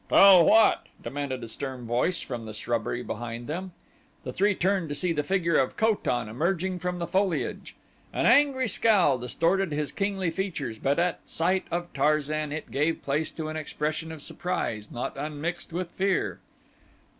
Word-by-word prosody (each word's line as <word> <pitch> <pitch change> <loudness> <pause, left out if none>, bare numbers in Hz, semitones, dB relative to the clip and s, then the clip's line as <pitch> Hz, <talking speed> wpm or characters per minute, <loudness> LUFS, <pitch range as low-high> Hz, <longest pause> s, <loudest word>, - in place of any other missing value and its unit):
"Tell 190 -3 +8
what?" 220 +5 +5 0.2
demanded 135 -3 -4
a - - -5
stern 130 +2 -5
voice 125 +10 +1
from 120 -4 -5
the 110 0 -6
shrubbery 120 +2 -2
behind 120 +1 -5
them. 180 +6 -4 0.5
The - - -5
three 205 +1 +2
turned 185 -3 0
to 145 - -2
see 170 +4 0
the 150 - 0
figure 170 +1 +1
of 130 - 0
Ko 220 0 +4
tan 120 - -2
emerging 175 - -1
from 180 +1 -2
the 170 - -2
foliage. 185 +1 -1 0.4
An - - -1
angry 275 -3 +4
scowl 190 - +4
distorted 165 - +1
his 145 -2 -2
kingly 195 -2 -1
features 155 - -3
but 140 +1 +1
at 175 0 -1
sight 185 +3 0
of 175 +1 -3
Tarzan 150 +1 +1
it 155 +1 -5
gave 155 +4 0
place 150 +3 -1
to 160 -1 -4
an 155 - -5
expression 155 +1 -3
of 155 -2 -8
surprise 140 -12 -3
not 120 - -4
unmixed 155 +5 -4
with 175 +1 -3
fear. 195 0 0
160 Hz, 170 wpm, -27 LUFS, 140-185 Hz, 0.5 s, Tell